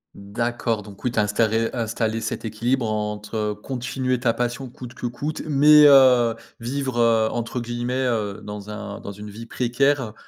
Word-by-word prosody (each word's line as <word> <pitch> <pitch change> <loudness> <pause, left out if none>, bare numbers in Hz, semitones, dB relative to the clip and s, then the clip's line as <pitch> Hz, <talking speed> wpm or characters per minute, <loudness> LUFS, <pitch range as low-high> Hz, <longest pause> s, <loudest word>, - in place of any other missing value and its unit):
D'accord. 115 +2 -2
Donc 100 -1 -13
oui, 125 - 0
tu 115 - -1
as - - +4
installé- 110 +2 +1
installé 115 -1 -1
cet 110 - -4
équilibre, 115 +2 -1
entre, 105 0 -4
heu, 105 -1 -1
continuer 130 +2 -3
ta 120 -2 +1
passion 120 +2 -3
coûte 120 0 -10
que - - -6
coûte, 140 +6 -4
mais, 150 +1 +7
heu, 130 -4 +7 0.3
vivre, 130 +1 -3
heu, 115 -1 +4
entre 120 +2 -3
guillemets, 120 +2 -2
heu, 105 -4 -2
dans 105 0 -7
un 105 -1 -6
«dans 100 - -7
une 105 +1 -9
vie 110 +3 -9
précaire», 125 0 0
115 Hz, 175 wpm, -23 LUFS, 105-125 Hz, 0.3 s, mais